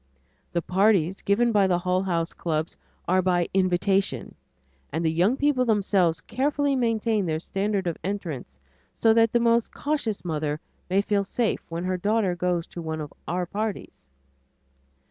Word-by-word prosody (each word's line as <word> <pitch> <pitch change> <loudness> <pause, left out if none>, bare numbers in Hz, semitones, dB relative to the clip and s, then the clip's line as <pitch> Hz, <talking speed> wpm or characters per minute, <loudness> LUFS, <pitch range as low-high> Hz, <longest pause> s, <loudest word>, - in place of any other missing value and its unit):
The 170 -1 0
parties 190 -2 +2
given 235 +4 +2
by 205 -3 +4
the 180 -2 +2
Hull 180 +1 0
House 170 -3 -1
clubs 160 -1 -2 0.3
are 185 +1 +3
by 175 -2 +1
invitation 190 +1 +1 0.6
and 160 +3 -2
the 160 - +3
young 185 +10 +2
people 285 -3 +2
themselves 195 - +2
carefully 280 - 0
maintain 225 -5 +1
their 155 -1 -1
standard 195 +2 -1
of 170 -2 -2
entrance 160 - -5 0.4
so 225 -1 +4
that 230 0 +4
the 240 - +3
most 235 0 +2
cautious 280 -10 -2
mother 155 -2 -2 0.3
may 195 +2 +2
feel 205 -1 +1
safe 225 +3 -1
when 165 +1 -4
her 185 0 -1
daughter 205 -1 +1
goes 175 -1 0
to 175 - -8
one 160 -1 -4
of 150 -2 -6
our 180 +1 -1
parties. 205 - -5
190 Hz, 160 wpm, -25 LUFS, 170-220 Hz, 0.6 s, by